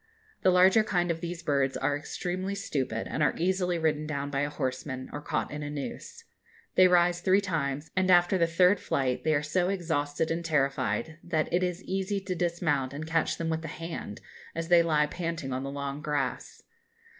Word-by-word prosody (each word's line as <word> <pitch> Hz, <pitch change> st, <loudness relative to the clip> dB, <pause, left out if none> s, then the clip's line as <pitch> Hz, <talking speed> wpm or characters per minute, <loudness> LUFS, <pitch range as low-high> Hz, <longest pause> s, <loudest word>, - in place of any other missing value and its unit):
The -, -, +4 dB
larger 185 Hz, +4 st, +6 dB
kind 175 Hz, -4 st, +1 dB
of 165 Hz, 0 st, -4 dB
these 175 Hz, 0 st, -5 dB
birds 140 Hz, -3 st, +1 dB
are 140 Hz, +1 st, 0 dB
extremely 185 Hz, +6 st, -3 dB
stupid, 130 Hz, -, -2 dB
and 155 Hz, -, -3 dB
are 150 Hz, -, +3 dB
easily 180 Hz, 0 st, +1 dB
ridden 155 Hz, -2 st, 0 dB
down 140 Hz, -2 st, -3 dB
by 140 Hz, -, -1 dB
a 145 Hz, +1 st, 0 dB
horseman, 130 Hz, -2 st, -4 dB
or 145 Hz, -, -4 dB
caught -, -, -2 dB
in 150 Hz, -, -5 dB
a 145 Hz, -, -4 dB
noose. 150 Hz, +11 st, -6 dB, 0.5 s
They 185 Hz, -, +7 dB
rise 175 Hz, -1 st, +3 dB
three 190 Hz, +2 st, +4 dB
times, 155 Hz, -5 st, -2 dB
and 185 Hz, 0 st, +2 dB
after 175 Hz, +1 st, +5 dB
the 170 Hz, -, +4 dB
third 180 Hz, +4 st, +4 dB
flight 130 Hz, -2 st, -1 dB
they 155 Hz, -1 st, +2 dB
are 145 Hz, -, 0 dB
so 175 Hz, +4 st, +1 dB
exhausted 160 Hz, -5 st, -1 dB
and 170 Hz, +1 st, -1 dB
terrified 155 Hz, +1 st, 0 dB
that 160 Hz, -2 st, -1 dB
it 175 Hz, -, +3 dB
is 180 Hz, 0 st, -2 dB
easy 195 Hz, +1 st, -1 dB
to 190 Hz, -1 st, -3 dB
dismount 165 Hz, -6 st, 0 dB
and 155 Hz, +2 st, -5 dB
catch 160 Hz, 0 st, 0 dB
them 165 Hz, -1 st, -2 dB
with 160 Hz, 0 st, -1 dB
the 160 Hz, -, -6 dB
hand, 165 Hz, -9 st, -6 dB, 0.3 s
as 165 Hz, 0 st, -3 dB
they 175 Hz, -1 st, +7 dB
lie 155 Hz, -3 st, +3 dB
panting 165 Hz, -4 st, -4 dB
on 130 Hz, -, -2 dB
the 135 Hz, -, -4 dB
long 140 Hz, +1 st, -4 dB
grass. 150 Hz, -1 st, -3 dB
160 Hz, 200 wpm, -28 LUFS, 145-180 Hz, 0.5 s, They